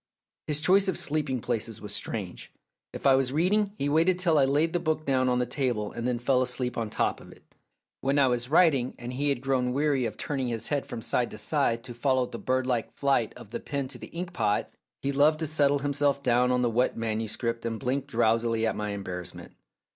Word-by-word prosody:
His 150 0 0
choice 195 +4 +4
of 190 - 0
sleeping 145 -5 -1
places 115 -2 -3
was 105 -1 -5
strange. 100 -6 -5 0.4
If - - -8
I 135 - +7
was 130 -1 +2
reading, 200 +7 +1
he 140 - -1
waited 165 +5 +3
till 170 -4 +3
I 135 - +5
laid 150 +4 +2
the 175 - +1
book 155 -2 -1
down 130 -2 +2
on 125 - +2
the 125 - +1
table 120 -5 -1
and 120 +1 -4
then 125 -1 0
fell 125 +2 +2
asleep 125 -1 -2
on 115 -2 -2
top - - -1
of - - -13
it. - - -20 0.5
When 135 +2 0
I 140 - +5
was 125 0 -1
writing 145 -6 +3
and 120 0 -6
he 145 +3 0
had 140 -3 0
grown 130 -2 0
weary 140 -2 +1
of 105 - -8
turning 135 -3 -2
his 115 -2 -3
head 145 -2 -1
from 115 - -6
side 120 +2 0
to - - -9
side 115 0 +1
to 125 - -8
follow 130 +1 +1
the - - -8
birdlike 130 -2 0
flight 135 -5 +1
of 105 - -13
the - - -3
pen 140 -2 -3
to - - -10
the - - -8
ink 175 +1 -6
pot, 105 - 0 0.3
he 140 - 0
loved 145 +3 +4
to - - +1
settle 145 -2 +3
himself 140 -1 +1
down 125 0 +3
on 125 0 +2
the 120 - +2
wet 125 +3 +1
manuscript 115 +1 -2
and 115 -1 -3
blink 135 +1 -1
drowsily 115 0 +1
at 110 - 0
my 105 0 -3
embarrassment. 90 -3 -6
130 Hz, 225 wpm, -27 LUFS, 115-145 Hz, 0.5 s, I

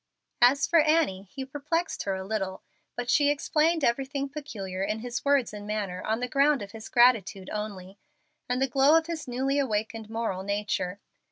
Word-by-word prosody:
As 255 +3 +5
for 335 - +4
Annie, 300 - +2
he 270 -1 -6
perplexed 300 +5 -2
her 195 -1 0
a 190 - -5
little, 195 -2 -3 0.3
but 245 0 -4
she 290 +3 +4
explained 305 +2 +1
everything 275 +3 0
peculiar 200 -11 -6
in 210 +3 -2
his 245 +1 -4
words 280 -5 +2
and 205 0 -8
manner 200 -4 -3
on 220 +2 -1
the 250 - -1
ground 280 -1 +3
of 200 - -9
his 220 0 -9
gratitude 225 -6 +3
only, 200 -2 -6 0.5
and 250 +1 0
the 270 - +2
glow 275 +5 +5
of 325 - +1
his 330 -3 -5
newly 265 +3 0
awakened 220 -3 -2
moral 225 -4 -2
nature. 200 -1 -2
240 Hz, 180 wpm, -27 LUFS, 205-280 Hz, 0.5 s, As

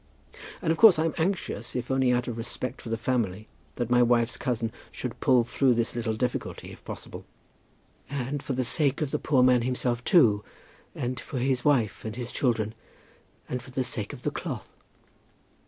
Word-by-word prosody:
"And 160 - +2
of 160 - -1
course 220 -7 +9
I'm 160 0 +1
anxious, 160 - -2
if 125 +1 -3
only 130 -1 +3
out 125 0 +1
of 120 - -3
respect 125 +2 -3
for 115 - -8
the 115 - -1
family, 110 -4 -1 0.3
that 120 -1 -3
my 125 0 +5
wife's 120 -1 +3
cousin 115 -3 -2 0.2
should - - -6
pull 125 -2 +4
through 125 +1 +2
this 115 0 0
little 115 -2 -1
difficulty, 125 +2 -3
if - - -13
possible." - - -7 0.9
"And 140 +1 -3
for 140 - -3
the 130 0 0
sake 140 +3 +3
of 140 - -3
the - - 0
poor 135 -4 +3
man 125 -1 +5
himself 125 0 -1
too, 110 - +5 0.5
and 125 0 -3
for 140 - -6
his 130 0 +1
wife, 125 -8 +2
and 110 0 -5
his 120 -1 -5
children; 115 -4 0 0.7
and 125 - -3
for 130 - -13
the 130 0 -1
sake 110 -4 -3
of - - -10
the - - 0
cloth." - - -6
125 Hz, 190 wpm, -27 LUFS, 115-135 Hz, 0.9 s, course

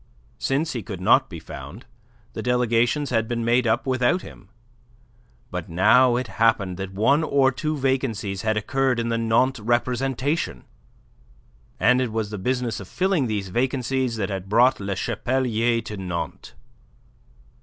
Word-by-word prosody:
Since 145 +4 0
he 120 - -3
could 95 -2 -7
not 90 - +4
be - - -7
found, - - -10 0.5
the - - -5
delegations 125 +3 +1
had 115 -2 +1
been 115 -1 -2
made 120 +1 +2
up 110 - +1
without 130 +7 +1
him. 100 - -13 1.0
But 90 -2 -5
now 110 +9 +4
it 125 +1 -1 0.2
happened 100 -5 +2
that 95 0 -5
one 125 +11 +2
or 140 -3 +3
two 155 +3 -3
vacancies 120 -8 -1
had 110 -1 0
occurred 130 +3 0
in 115 0 -1
the 115 0 0
Nantes 115 +3 +2
representation; 125 - -1 1.2
and 125 +5 +4
it 125 -3 -1
was 110 -1 -2
the 105 - -5
business 125 +1 -1
of 95 - -9
filling 185 - 0
these 100 -3 -3
vacancies 130 +2 -1
that 100 -3 -2
had 95 0 -5
brought 120 +5 +4
Le 100 -1 -3
Chapelier 120 0 0
to 105 -1 -7
Nantes. 90 -3 -5
120 Hz, 155 wpm, -23 LUFS, 105-130 Hz, 1.2 s, not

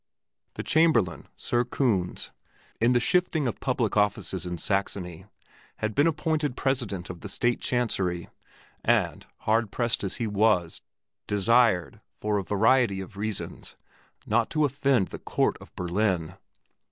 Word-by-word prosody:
The - - -4
Chamberlain, 120 - +2
Sir 120 0 0
Kunz, 115 -8 -1 0.5
in 120 +2 +4
the 120 - +4
shifting 160 +1 +1
of 120 - -3
public 125 -5 0
offices 100 -4 0
in 90 0 -4
Saxony, 95 -2 -2 0.5
had 110 0 -3
been 145 +6 +4
appointed 150 -3 0
President 115 -10 -1
of 85 - -11
the 105 - -6
State 120 +4 0
Chancery, 95 -8 0 0.6
and, - - +1
hard 110 0 +1
pressed 120 0 0
as 95 - -2
he 120 - -2
was, 105 -5 +1 0.5
desired, 105 -2 +2
for 105 -1 -1
a - - -3
variety 110 +1 +3
of 95 0 -8
reasons, 105 0 -5 0.5
not 115 +1 +1
to 155 -1 +2
offend 135 -6 +1
the - - -7
Court - - 0
of - - -13
Berlin. 90 -2 0
110 Hz, 140 wpm, -27 LUFS, 95-125 Hz, 0.6 s, in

